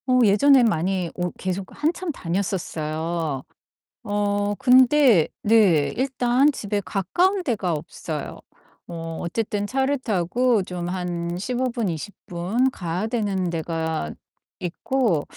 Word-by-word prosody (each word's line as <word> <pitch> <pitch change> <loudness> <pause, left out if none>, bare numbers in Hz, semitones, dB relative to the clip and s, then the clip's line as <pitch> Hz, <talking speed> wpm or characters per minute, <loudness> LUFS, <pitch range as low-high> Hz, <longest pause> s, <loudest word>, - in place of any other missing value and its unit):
어 255 0 +4
예전에 250 +6 +6
많이 185 -3 0
오 180 0 -2
계속 185 0 -3
한참 330 +3 -1
다녔었어요. 165 - -3 0.6
어 205 0 0
근데 255 - +5
네 200 -9 +4
일단 260 +1 +2
집에 205 -6 -3
가까운 360 - +1
데가 210 - -1
없어요. 155 0 -5 0.5
뭐 165 -1 -6
어쨌든 205 +3 -2
차를 270 +4 +1
타고 225 +1 +1
좀 180 -1 -5
한 175 -1 -3
15 250 +6 -1
분, 235 -5 -1
20 170 +5 -5
분 190 +10 0
가야 180 0 -3
되는 205 -6 -1
데가 160 - -2 0.5
있고 185 - 0
200 Hz, 205 characters per minute, -23 LUFS, 170-245 Hz, 0.6 s, 예전에